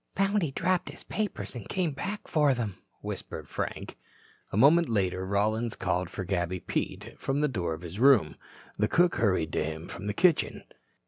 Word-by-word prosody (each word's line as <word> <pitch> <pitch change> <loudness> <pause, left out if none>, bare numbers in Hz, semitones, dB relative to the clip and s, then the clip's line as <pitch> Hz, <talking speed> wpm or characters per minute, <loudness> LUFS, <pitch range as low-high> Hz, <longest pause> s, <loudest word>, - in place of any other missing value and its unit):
"Found 195 +2 +2
he 165 - 0
dropped 180 +6 0
his - - -10
papers 215 -2 -3
and 120 -6 -8
came 180 -4 0
back 200 +9 -5
for 150 -4 +3
them," 110 -6 -3 0.2
whispered - - -6
Frank. - - -5 0.5
A - - -2
moment 150 +7 +6
later 95 -4 0
Rollins 110 +4 0
called 90 -1 -1
for 95 - -5
Gabby 90 -1 -1
Pete - - -3
from 135 +2 0
the 150 - +3
door 90 - -2
of 80 - -12
his 90 +4 -7
room. 135 -3 +5 0.4
The - - +3
cook 175 0 +3
hurried 95 -7 +1
to - - +1
him 80 +1 -5
from 100 - -7
the 105 - -2
kitchen. 170 - +2
110 Hz, 185 wpm, -29 LUFS, -, 0.5 s, moment